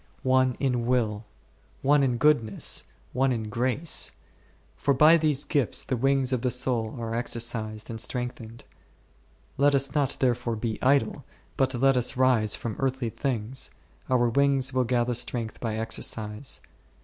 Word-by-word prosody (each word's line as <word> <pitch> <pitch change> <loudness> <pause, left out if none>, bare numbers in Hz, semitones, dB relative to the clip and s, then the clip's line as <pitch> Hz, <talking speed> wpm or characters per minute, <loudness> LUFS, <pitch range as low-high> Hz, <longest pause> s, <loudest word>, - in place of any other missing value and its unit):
one 130 -1 +2
in 125 -4 0
will, 110 -4 0 0.6
one 145 +1 +4
in 125 -3 +1
goodness, 120 -8 +2 0.3
one 130 +1 +2
in 110 -3 -3
grace; 130 +7 0 0.6
for 140 -1 +1
by 155 +5 +7
these 150 -4 +2
gifts 140 -6 0
the 130 - -2
wings 135 +1 +1
of 125 - 0
the 125 - 0
soul 125 -2 -1
are 115 -1 -4
exercised 115 -2 -2
and 115 -1 -3
strengthened* 120 -2 -5 0.9
Let 140 +1 +4
us 135 0 +1
not 145 -3 +1
therefore 120 -2 0
be 110 0 -4
idle, 140 +1 +2 0.3
but 130 -1 +1
let 135 +2 +3
us 125 +1 0
rise 125 -5 +4
from 115 -3 -5
earthly 130 -3 -1
things; 125 -1 -3 0.4
our 125 -2 +3
wings 135 +1 +1
will 130 -1 +1
gather 120 0 0
strength 115 -1 -3
by 110 -2 -3
exercise. 110 +1 -3
125 Hz, 150 wpm, -26 LUFS, 115-135 Hz, 0.9 s, by